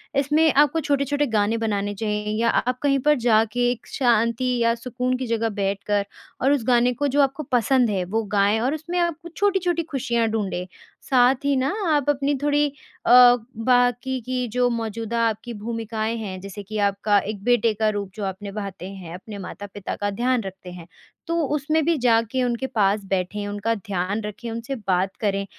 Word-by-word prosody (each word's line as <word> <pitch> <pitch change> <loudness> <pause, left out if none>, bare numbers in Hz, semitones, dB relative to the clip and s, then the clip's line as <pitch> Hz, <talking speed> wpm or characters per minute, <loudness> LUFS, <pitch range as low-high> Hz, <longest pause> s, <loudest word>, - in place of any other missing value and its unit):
इसमें 295 +3 +3
आपको 295 +3 +4
छोटे-छोटे 285 -1 0
गाने 220 -1 +1
बनाने 205 -2 -1
चाहिए 210 0 -2
या 230 - +3
आप 250 +2 0
कहीं 275 -1 +3
पर 300 - +6
जाके 225 +2 +3
एक 245 - -7
शांति 240 0 +2
या 230 0 +3
सुकून 250 +2 -2
की 260 - -4
जगह 230 0 0
बैठकर 200 +1 0 0.4
और 270 - +3
उस 285 -5 +1
गाने 245 0 +4
को 285 +4 -1
जो 285 +1 +2
आपको 275 +2 0
पसंद 250 0 +3
है 195 -3 0
वो 225 - +2
गाएँ 205 +2 +3
और 255 +5 0
उसमें 340 +3 -3
आप 340 -2 +1
कुछ 340 -1 -12
छोटी-छोटी 370 -4 +1
खुशियाँ 245 -7 -1
ढूँढें। 200 -5 -2 0.4
साथ 255 0 +5
ही 285 0 +2
ना 265 +1 +1 0.3
आप 290 -1 0
अपनी 285 0 +1
थोड़ी 295 0 +3 0.4
अ, 245 0 +8 0.3
बाकी 245 +1 +2
की 250 +1 -2
जो 250 0 +3
मौजूदा 230 0 -3
आपकी 225 +2 -4
भूमिकाएँ 225 0 -3
हैं 195 -4 -5
जैसे 200 +1 -8
कि 215 +2 -6
आपका 200 +1 +2
एक 200 0 -6
बेटे 235 -1 +3
का 215 +1 +1
रूप 205 -2 -3
जो 210 - -5
आप 190 -1 -4
निभाते 200 -2 -6
हैं 185 -4 -9
अपने 200 +3 -9
माता-पिता 200 +1 -7
का 205 - -2
ध्यान 245 +4 0
रखते 190 -1 -9
हैं। 175 -2 -10 0.4
तो 335 0 0 0.2
उसमें 310 +2 +1
भी 335 -1 +2
जाके 235 0 +2
उनके 245 +1 -1
पास 205 -3 +1
बैठें 195 +2 -2
उनका 205 +2 -1
ध्यान 200 0 -3
रखें 210 +3 -6
उनसे 230 +4 -4
बात 185 +1 +1
करें। 200 -2 0
230 Hz, 185 wpm, -23 LUFS, 205-260 Hz, 0.4 s, अ